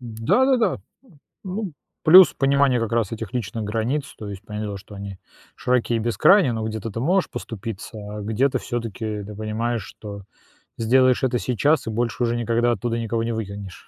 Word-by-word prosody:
Да-да-да. 195 - +2
Э, - - -15 0.7
ну, 190 -1 -4 0.3
плюс 180 0 +9
понимание 135 -2 +3
как 115 -2 -2
раз 115 -4 0
этих 115 -3 -6
личных 115 -2 -3
границ, 115 +7 -2
то 105 - -7
есть 100 -1 -7
понятное 105 0 -4
дело, 100 - -5
что 100 +1 -13
они 100 -1 -7 0.4
широки 125 -1 +1
и - - +1
бескрайний, 125 - +4
но 110 -1 -3
где-то 110 0 -4
ты 115 - -5
можешь 180 +9 +1
поступиться, 115 +1 -7 0.2
а - - -5
где-то 115 +6 +1
всё-таки 110 -3 -4
ты 105 +1 -9
понимаешь, 110 +1 -2
что 100 +1 -9 0.5
сделаешь 130 +3 +3
это 125 -2 +1
сейчас 140 +5 +1
и - - 0
больше 115 +2 -1
уже 120 0 +1
никогда 120 +1 +1
оттуда 115 +1 -1
никого 115 0 -1
не 115 0 -2
выкинешь. 100 -4 -7
115 Hz, 175 wpm, -23 LUFS, 110-125 Hz, 0.7 s, плюс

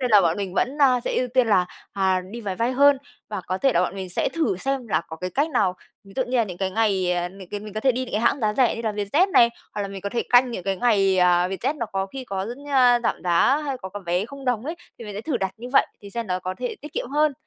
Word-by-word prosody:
nên 250 -2 0
là 210 -2 +8
bọn 170 -1 +2
mình 195 -3 -4
vẫn, 275 +8 0
ờ, 255 -3 +5
sẽ - - -1
ưu 250 - +1
tiên 250 -1 +2
là, 185 -4 +3 0.3
à, 190 -2 +1
đi 235 +1 -7
máy 195 -4 -4
bay 235 +2 0
hơn. 280 +1 +5 0.3
Và 205 -3 -4
có 185 +1 -2
thể 270 -1 +3
là 175 - +3
bọn 180 - -1
mình 190 -2 -5
sẽ 175 - 0
thử 315 - 0
xem 270 +2 -2
là - - +2
có 160 - -7
cái 180 +3 -4
cách 290 +4 0
nào, 185 -10 +1 0.3
ví 195 - -15
dụ 260 - +2
như 250 +1 -1
là 235 - +4
những 180 -4 -8
cái 190 -1 -1
ngày, 190 -4 +1
ờ, 175 0 -1
những 190 -1 -12
cái 205 - -5
mình 210 0 -9
có 215 - -3
thể 260 +1 +3
đi 255 +2 -2
những 255 - -11
cái 210 - 0
hãng 260 +3 +2
giá 210 -1 +1
rẻ 250 -1 +3
như 230 - -5
là 220 -2 -1
Vietjet 210 - +1
này, 235 -9 +6 0.3
hoặc 205 - -2
là 200 - -4
mình 195 0 -7
có 200 - -3
thể 235 +2 -1
canh 245 +1 +5
những 185 -7 -5
cái 195 -1 0
ngày, 195 -4 +3
à, 180 0 +4
Vietjet 245 +10 -2
nó 235 - -2
có 195 -1 -2
khi 260 +6 -8
có 195 -2 -3
rất 240 +4 -6
nh 285 - -13 0.4
giảm - - -1
giá 175 +11 +4
hay 275 -3 -3
có 190 - -7
có 205 +2 -7
vé 180 +4 +1
0 275 +2 -10
đồng 245 -3 0
ấy, 320 +4 -3 0.2
thì 235 - -8
mình 210 -2 -7
sẽ 205 - -4
thử 265 +2 -2
đặt 190 -3 -1
như 240 +2 -8
vậy - - +5 0.2
thì 200 - -10
xem 235 +1 -4
nó 180 -1 -1
có 185 +1 -4
thể 245 -1 -3
tiết 300 - -10
kiệm - - -3
hơn. 300 +1 +2
215 Hz, 320 wpm, -24 LUFS, 190-255 Hz, 0.4 s, là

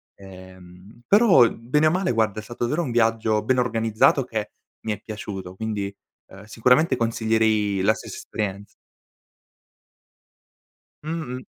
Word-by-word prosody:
Ehm, 95 +1 -15
però 200 - +6
bene 150 +7 0
o - - +3
male, 185 -6 0
guarda, 110 -2 0
è 110 - -8
stato 120 +1 -4
davvero 155 +8 -1
un 130 - -4
viaggio 115 -2 +1
ben 130 +3 +1
organizzato 115 +2 +2
che 110 -4 -5 0.3
mi 110 - -2
è 105 - -9
piaciuto, 95 -4 -7
quindi, 100 -2 -4 0.3
uhm, 95 +2 -14
sicuramente 125 +7 +2
consiglierei 110 -3 +1
la 105 +3 +3
stessa - - -9
esperienz 100 -1 -5 2.4
Mh-mh. 155 -6 -5
110 Hz, 130 wpm, -23 LUFS, 100-125 Hz, 2.4 s, però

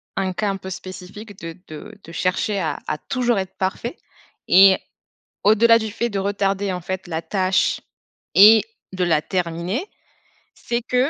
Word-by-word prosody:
un 190 -1 -1
cas 205 +3 -1
un 195 - -1
peu 190 - -9
spécifique 190 +3 -9
de 165 +1 -7
de 175 +8 -10
de 165 - -13
chercher 185 +4 -1
à 160 - -2
à 155 - -1
toujours 245 - -1
être 190 -1 -4
parfait 205 - -3 0.5
et 190 0 +7 0.7
au-delà 230 +2 +6
du 220 -1 -4
fait 235 +2 -1
de 200 - -2
retarder, 195 0 -1
en 180 - -4
fait, 190 +2 -5
la 160 -2 -2
tâche 190 -1 +1 0.6
et 215 +2 +9 0.3
de 185 -1 -3
la 165 -3 +2
terminer, 180 - -2 0.7
c'est 235 0 -3
que, 250 +3 +1
195 Hz, 160 wpm, -21 LUFS, 185-215 Hz, 0.7 s, et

